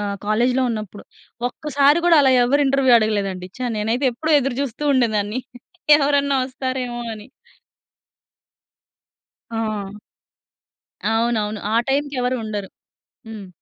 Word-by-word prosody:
ఆహ్, 200 -1 -3
కాలేజ్‌‌లో 245 +5 +2
ఉన్నప్పుడు. 215 -3 -6 0.4
ఒక్కసారి 285 +3 +2
కూడా, 335 - +6
అలా 265 -1 +4
ఎవ్వరు 285 +4 +2
ఇంటర్వ్యూ 270 -2 +4
అడగలేదండి. 200 -4 -2
ఛా! 255 - -2
నేనైతే 230 +6 0
ఎప్పుడూ 315 +6 -2
ఎదురుచూస్తూ 275 0 -3
ఉండేదాన్ని. 220 -2 0 0.6
ఎవరన్నా 280 -1 +2
వస్తారేవో 255 -2 -4
అని. 210 0 -12 2.3
ఆ! 215 -3 -3 1.2
అవునవును. 220 -2 0
ఆ - - +2
టైంకి 285 +1 -1
ఎవరూ 250 +1 0
ఉండరు. 205 -3 -5 0.6
హ్మ్. 215 -3 -9
240 Hz, 105 wpm, -21 LUFS, 215-275 Hz, 2.3 s, కూడా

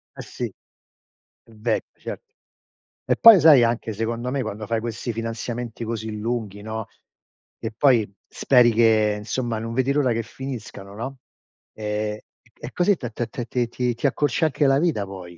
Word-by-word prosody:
Eh - - -7
sì, 125 - -5 1.0
è - - -23
vecchio, 110 +1 -3
certo. 450 -1 -8 0.7
E - - +3
poi 225 -6 +9
sai, 150 -7 +7
anche 115 -1 -1
secondo 115 +3 -3
me 140 -1 -1
quando 110 -1 -5
fai 115 -1 0
questi 115 0 -4
finanziamenti 115 +1 -5
così 110 -1 -4
lunghi, 105 -3 -3
no, 110 0 -5 0.7
e 110 - -4
poi 120 -6 +3 0.2
speri 125 -3 +4
che 110 -2 +3
insomma 115 +1 -2
non 115 +1 -5
vedi 130 +2 +1
l'ora 140 -4 +2
che 115 0 -2
finiscano, 110 -5 -8
no, 130 +4 -6 0.6
ehm, 105 0 -3
e - - -15 0.3
c - - -29
e 120 - -6
così 185 +2 +3
t 120 - -5
t 115 +1 -3
t 120 +1 -5
ti 120 -2 -1
ti 125 0 -1
ti 140 - +1
accorcia 145 +2 +1
anche 150 -1 +1
la 135 +1 +4
vita 150 - 0
poi. 90 -3 -10
115 Hz, 175 wpm, -23 LUFS, 110-130 Hz, 1.0 s, poi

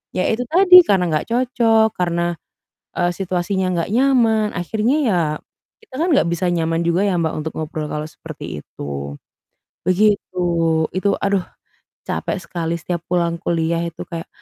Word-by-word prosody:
ya 185 - +1
itu 230 +3 0
tadi, 365 +2 +8
karena 185 -3 +2
nggak 155 -1 -1
cocok, 230 -3 +3
karena, 175 -1 0 0.6
eee, 175 0 +2
situasinya 185 +1 -1
nggak 170 +3 -2
nyaman. 235 -5 +3
Akhirnya 220 - 0
ya, 180 -5 +2 0.6
kita 275 - -19
kan 345 - +1
nggak 275 - +3
bisa 175 +1 0
nyaman 165 -1 0
juga 170 +4 +2
ya, 195 - +1
Mbak, 160 -1 -1
untuk 160 - -4
ngobrol 155 -1 -4
kalau 150 0 -3
seperti 75 - -8
itu. 70 0 -6 0.7
Begitu. 185 -1 +1 0.6
Itu 195 +2 +1
aduh, 200 -2 +1 0.6
capek 200 - -2
sekali 170 -2 -3
setiap 170 0 -3
pulang 170 -1 +1
kuliah 165 0 0
itu 170 -1 -7
kayak, 165 -2 -6
180 Hz, 150 wpm, -20 LUFS, 170-215 Hz, 0.7 s, tadi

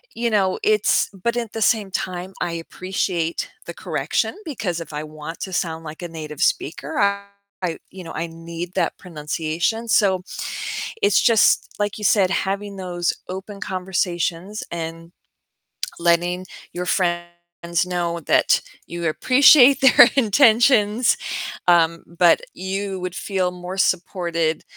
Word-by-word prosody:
you 235 0 0
know, 195 -3 +1
it's 215 -1 +3
But, 235 +5 -2
at 230 -3 -3
the 225 - -4
same 215 -3 +2
time, 185 0 -4
I 175 - -1
appreciate 170 0 -3 0.2
the - - -7
correction, - - -2
because 215 - -3
if 160 - -9
I 150 +1 -4
want 155 +2 -8
to 190 - -5
sound 165 -3 -2
like 155 +3 -8
a - - -3
native 155 -3 -8
speaker, 150 - -1 0.6
I, 175 -3 -2
you 185 -1 -9
know, 165 - -8
I 165 +1 -3
need 170 +2 -7
that - - 0
pronunciation, 165 +6 -3
so 190 -4 +3 0.8
it's 410 - +4
just, 230 -3 +4
like 205 0 -2
you 210 - -6
said, 195 -4 +4
having 200 +1 -2
those 175 -2 -2 0.2
open 195 +2 -7
conversations 185 +1 -2
and 165 0 -6 0.9
letting 175 +2 +1 0.3
your 180 +1 -4
friends 175 -2 0 0.6
know 170 -1 -2
that - - +3 0.3
you 170 -1 -3
appreciate 265 - +6
their 260 -2 +8
intentions, 230 -1 +4 0.5
um, 170 -1 +4
but 170 0 +4
you 190 +1 -4
would 180 -1 -4
feel 190 -3 -1
more 180 +1 -7
supported 170 -4 0
180 Hz, 135 wpm, -22 LUFS, 170-205 Hz, 0.9 s, their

